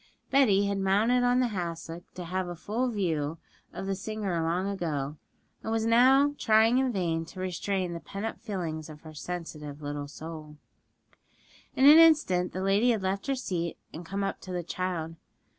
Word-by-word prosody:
Betty 215 -8 +4
had 200 0 -1
mounted 215 +6 +3
on 245 +1 +3
the 245 - +1
hassock 170 -3 -5
to 180 - -6
have 185 +1 -2
a 175 - -5
full 225 +9 -2
view 165 -8 -1 0.3
of - - -6
the 195 - -1
singer 195 -3 -3
long 170 +4 0
ago, 155 -7 -3 0.4
and 220 - -4
was 225 0 0
now 265 +5 +5
trying 225 +3 +4
in 265 -1 +1
vain 170 -6 -1
to 180 +3 -11
restrain 185 0 -2
the 170 - -5
pent 200 +5 -6
up 225 - -4
feelings 165 -8 -4
of 150 -1 -11
her 155 -1 -11
sensitive 150 -3 -6
little 145 -1 -5
soul. 155 0 -9 1.2
In 265 - +4
an 300 +3 +10
instant 295 - +4
the 185 - -4
lady 200 +5 +3
had 220 -5 +1
left 195 +4 -2
her 275 - +1
seat 175 -9 -3 0.2
and 165 - -7
come 195 +4 -3
up 195 - -3
to 185 - -8
the 180 -1 -2
child. 170 -2 -3
185 Hz, 185 wpm, -28 LUFS, 165-220 Hz, 1.2 s, an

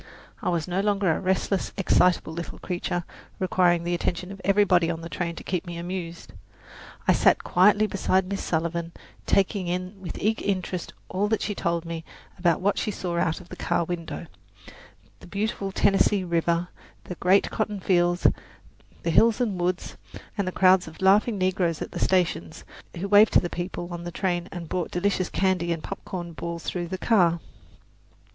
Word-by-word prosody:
I - - 0
was 170 -2 -1
no 180 +2 0
longer 200 -3 +2
a - - 0
restless, 190 +1 0
excitable 180 -4 +3
little 170 +1 -6
creature, 175 -1 -3 0.3
requiring 180 -2 +2
the 175 +1 -1
attention 175 +1 -2
of 195 -1 -9
everybody 195 -4 +4
on 165 -1 -3
the 165 - -7
train 170 -1 -3
to - - -9
keep 180 -2 -2
me 170 -1 -5
amused. 170 -1 -6 0.7
I - - +6
sat - - +3
quietly 205 +4 +4
beside 190 -2 +1
Miss 200 +1 -3
Sullivan, 170 +1 -2 0.3
taking 195 -1 +2
in 185 +2 -4
with 175 - -6
eager 220 +2 0
interest 185 -2 -2
all 195 +3 0
that 220 0 0
she 205 - -1
told 170 -3 -1
me 165 -1 -5 0.4
about 175 -2 +2
what 200 +2 +1
she - - -1
saw 175 -4 -2
out 165 -1 0
of 180 -1 -15
the - - -8
car 175 -1 0
window: 170 0 -5 0.9
the - - -14
beautiful 200 +1 -2
Tennessee 195 0 +3
River, 170 0 0 0.3
the - - -6
great 185 +3 +3
cotton 210 -2 -2
fields, 175 -1 +2 0.8
the 170 - 0
hills 225 +6 +5
and 205 -8 -1
woods, 180 +1 -2 0.4
and 200 -3 -1
the - - 0
crowds 185 -1 +4
of 160 - -11
laughing 205 +3 +4
negroes 185 -3 0
at - - -5
the - - -5
stations, 175 - 0 0.3
who 190 +4 -3
waved 205 +2 +6
to - - +7
the 175 - -4
people 175 0 -4
on 170 0 -5
the 175 - -4
train 175 -1 -1
and 170 -2 -6
brought 180 +1 -2
delicious 185 0 0
candy 185 -2 +1
and 165 -2 -2
popcorn 175 -3 -6
balls 170 +1 -5
through 175 -1 -3
the 185 +2 -4
car. 175 -6 +3
180 Hz, 180 wpm, -26 LUFS, 170-195 Hz, 0.9 s, to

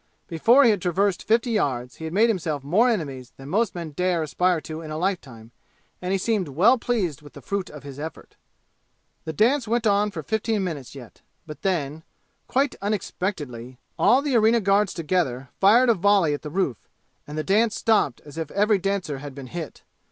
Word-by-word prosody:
Before 230 - +5
he 235 - +6
had 205 -4 -1
traversed 190 +2 0
fifty 230 +2 +2
yards 130 - -1
he 160 - -7
had 160 - -4
made 220 +3 +5
himself 160 - -2
more 200 - +3
enemies 140 - -3
than 135 +1 -10
most 210 +4 0
men 170 -3 -5
dare 175 +1 0
aspire 180 +3 +1
to 155 +1 -7
in 160 - -8
a 155 - -4
lifetime, 135 - -4 0.5
and 180 +1 -3
he 195 - +2
seemed 200 -2 0
well 175 - +4
pleased 195 - -1
with 145 -1 -14
the - - -10
fruit 200 -2 -3
of 150 -2 -11
his 140 -1 -9
effort. 155 +1 -8 0.9
The 160 - -3
dance 240 - +2
went 235 +1 0
on 205 0 +3
for 200 - -7
fifteen 220 -1 -1
minutes 145 -8 -5
yet, 125 -4 -12 0.2
but 150 -2 -10
then 160 -6 -1 0.5
quite 275 +1 +1
unexpectedly 160 - -4 0.2
all 265 +3 +4
the 285 -4 0
arena 225 +1 +4
guards 200 -1 +2
together 150 -7 -1
fired 225 +6 +6
a 235 - +6
volley 195 -5 +3
at 145 - -4
the 150 - -6
roof, 155 - -1 0.5
and 150 +1 -7
the 155 - -1
dance 210 +5 +2
stopped 215 - +1
as 150 +2 -9
if 160 -2 -4
every 205 +2 +2
dancer 185 -7 -2
had 145 -1 -9
been 140 -2 -8
hit. 165 +3 -7
180 Hz, 195 wpm, -24 LUFS, 150-210 Hz, 0.9 s, he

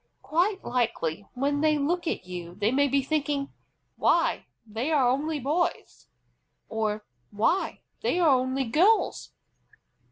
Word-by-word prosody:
Quite 350 +9 0
likely 220 -8 -1
when 285 +3 0
they 310 -1 +3
look 340 +5 -1
at 185 - -2
you 175 -1 -7
they 205 +3 +1
may 285 +2 +3
be 275 0 +1
thinking, 285 -1 -1 0.4
"Why, - - +2 0.2
they 225 +7 -3
are 280 -5 +4
only 295 +5 0
boys!" 305 +7 -2 0.6
or 215 -1 -2 0.2
"Why, 225 - 0 0.2
they - - 0
are 345 -3 +4
only 260 0 +2
girls!" 345 - +2
275 Hz, 130 wpm, -27 LUFS, 225-310 Hz, 0.6 s, are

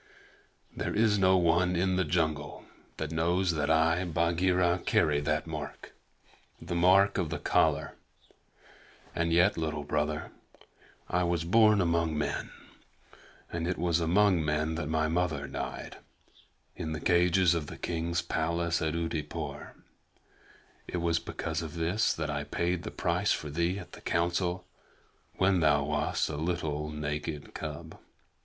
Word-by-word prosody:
"There - - -3
is 105 -1 +3
no 95 0 +5
one 90 +1 +2
in 95 +2 +1
the 95 - +2
jungle 80 -2 -1 0.3
that 80 -1 -4
knows 85 +3 +1
that 75 -2 -1
I, 80 +2 +3
Bagheera, 85 +1 +1
carry 75 -1 +2
that 75 +1 -1
mark 75 -3 -7 0.7
the 85 +2 -6
mark 95 +3 +4
of 85 -4 -1
the - - -3
collar; - - +1 1.2
and 85 0 0
yet, 90 +3 +4
Little 75 -2 -2
Brother, 75 +1 -2 0.8
I 90 - 0
was 85 -1 0
born 105 +3 +5
among 85 -2 +1
men, 75 -1 -2 1.0
and 85 0 -2
it 90 - -1
was 85 0 +1
among 90 +1 +3
men 75 +1 0
that 80 -2 -3
my 80 0 +1
mother 80 -3 -1
died 70 0 -6 0.8
in 80 -3 -4
the 75 - -4
cages 90 +1 +3
of 80 -3 -2
the - - -8
king's 85 0 -2
palace 85 +1 -1
at 80 0 -1
Oodeypore. 80 -3 -4 1.1
It - - -3
was 85 -1 +1
because 80 -1 -4
of 80 -2 -7
this 85 +6 +1
that 75 -1 -2
I 75 -1 -2
paid 85 +3 -1
the - - -5
price - - 0
for 75 - -5
thee 85 +5 0
at 90 - -9
the - - -12
Council 85 +1 -1 0.7
when 95 -1 +3
thou 75 -3 +3
wast 75 +1 0
a 75 - -4
little 80 -2 -2
naked 75 0 -4
cub. - - -7
85 Hz, 145 wpm, -29 LUFS, 80-90 Hz, 1.2 s, no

